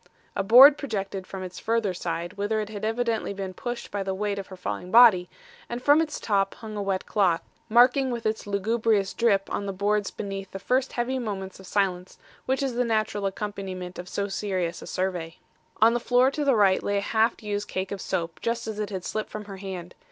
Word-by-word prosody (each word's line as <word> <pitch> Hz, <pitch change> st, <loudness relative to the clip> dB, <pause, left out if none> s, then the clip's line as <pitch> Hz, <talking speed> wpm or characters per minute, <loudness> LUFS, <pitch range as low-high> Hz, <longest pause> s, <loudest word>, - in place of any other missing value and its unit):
A -, -, +1 dB
board 260 Hz, +8 st, +8 dB
projected 195 Hz, -7 st, -4 dB
from 190 Hz, -1 st, -6 dB
its 185 Hz, 0 st, -7 dB
further 225 Hz, -4 st, 0 dB
side, 175 Hz, 0 st, -4 dB
whither 205 Hz, +2 st, -1 dB
it 210 Hz, -1 st, -3 dB
had 210 Hz, -1 st, -7 dB
evidently 225 Hz, -2 st, -1 dB
been 190 Hz, -1 st, -5 dB
pushed 240 Hz, +3 st, -5 dB
by 200 Hz, -, -2 dB
the 190 Hz, 0 st, -2 dB
weight 200 Hz, 0 st, -2 dB
of 195 Hz, -, -7 dB
her 190 Hz, -, -10 dB
falling 180 Hz, 0 st, -5 dB
body; 215 Hz, -6 st, +7 dB, 0.4 s
and 240 Hz, -, -3 dB
from 290 Hz, +5 st, +5 dB
its 305 Hz, -2 st, -3 dB
top 195 Hz, -2 st, 0 dB
hung 220 Hz, -1 st, -8 dB
a 205 Hz, -, -2 dB
wet 195 Hz, -1 st, -1 dB
cloth, 180 Hz, -5 st, +2 dB, 0.3 s
marking 250 Hz, +4 st, +5 dB
with 235 Hz, -2 st, -4 dB
its 215 Hz, -1 st, -1 dB
lugubrious 205 Hz, 0 st, +1 dB
drip 205 Hz, -5 st, +2 dB
on 200 Hz, -, -2 dB
the -, -, -1 dB
boards 205 Hz, +1 st, 0 dB
beneath 195 Hz, -2 st, -6 dB
the -, -, -6 dB
first 255 Hz, +6 st, 0 dB
heavy 255 Hz, +2 st, -1 dB
moments 195 Hz, -5 st, -5 dB
of 190 Hz, -, -12 dB
silence 185 Hz, -3 st, -1 dB, 0.3 s
which 265 Hz, +1 st, +1 dB
is 265 Hz, -2 st, -1 dB
the 245 Hz, +1 st, +1 dB
natural 215 Hz, -3 st, 0 dB
accompaniment 190 Hz, -3 st, -5 dB
of 180 Hz, +1 st, -7 dB
so 200 Hz, +1 st, -2 dB
serious 185 Hz, -4 st, -2 dB
a -, -, -9 dB
survey. 180 Hz, -3 st, -3 dB, 0.5 s
On 230 Hz, +1 st, +6 dB
the 240 Hz, -, +1 dB
floor 250 Hz, +2 st, +3 dB
to 295 Hz, +1 st, -2 dB
the 275 Hz, -3 st, +3 dB
right 195 Hz, -3 st, +4 dB
lay 205 Hz, 0 st, 0 dB
a -, -, +1 dB
half 220 Hz, +2 st, +1 dB
used 205 Hz, -1 st, -3 dB
cake 185 Hz, 0 st, -3 dB
of 200 Hz, -2 st, -4 dB
soap 165 Hz, -1 st, -3 dB
just 230 Hz, 0 st, -1 dB
as 220 Hz, -1 st, -5 dB
it 210 Hz, -, -2 dB
had 190 Hz, -3 st, -5 dB
slipped 215 Hz, 0 st, -3 dB
from 215 Hz, 0 st, -7 dB
her 195 Hz, -1 st, -8 dB
hand. 185 Hz, -3 st, -7 dB
205 Hz, 220 wpm, -26 LUFS, 190-230 Hz, 0.5 s, board